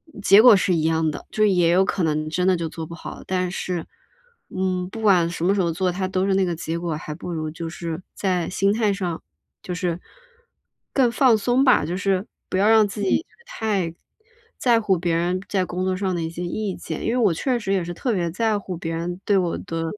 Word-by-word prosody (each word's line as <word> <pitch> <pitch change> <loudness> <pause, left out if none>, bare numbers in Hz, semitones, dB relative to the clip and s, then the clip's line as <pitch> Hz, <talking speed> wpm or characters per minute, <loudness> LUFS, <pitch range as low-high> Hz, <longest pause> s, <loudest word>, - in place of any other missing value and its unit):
嗯 205 - -9
结 200 +1 +8
果 240 -2 +8
是 185 -1 +1
一 165 - +1
样 160 -1 +1
的， - - -8
就 215 0 +2
也 180 -4 +3
有 185 +3 +4
可 195 - -1
能 155 -1 0
真 180 +3 0
的 185 - +4
就 165 -1 -3
做 160 0 -7
不 170 - -8
好。 - - -9
但 185 -1 -1
是， 180 -3 -3 0.6
嗯， 185 -1 -2
不 225 - -8
管 185 -6 +4
什 170 0 -3
么 195 - +4
时 200 - +1
候 170 -1 +1
做 180 +2 0
它 185 +1 -2
都 185 0 0
是 195 - +1
那 195 - +3
个 175 -2 -1
结 165 +1 -4
果， 170 -2 -2
还 150 0 -6
不 175 +3 -7
如 155 -2 -3
就 165 +1 -6
是 165 0 -5
在 180 -3 -1
心 195 +2 +1
态 220 -2 +1
上 180 -4 -3 0.4
就 180 - -5
是， 175 -1 -2 0.9
更 250 -4 +3
放 245 -3 +4
松 245 +5 +2
吧， 255 - +4
就 175 +3 -3
是 195 0 0 0.2
不 - - -1
要 200 +2 +3
让 220 -1 +6
自 205 - -6
己 200 - +1 0.2
太 200 - -2 0.6
在 235 -3 +3
乎 195 -4 +2
别 170 0 -1
人 175 +2 0
在 190 -2 +1
工 180 +1 -3
作 185 0 0
上 190 -2 -1
的 170 - -2
一 160 - -3
些 170 +2 -6
意 200 +2 -3
见。 160 - -6
因 - - +1
为 250 - 0
我 210 -8 +3
确 250 - -1
实 195 -3 -2
也 185 -3 +1
是 175 - -5
特 235 +7 -2
别 170 -4 -1
在 220 +3 +1
乎 190 -3 -6
别 165 -1 -4
人 175 +2 -4
对 200 -2 +3
我 175 -2 0
的 165 0 -4
185 Hz, 260 characters per minute, -23 LUFS, 170-200 Hz, 0.9 s, 结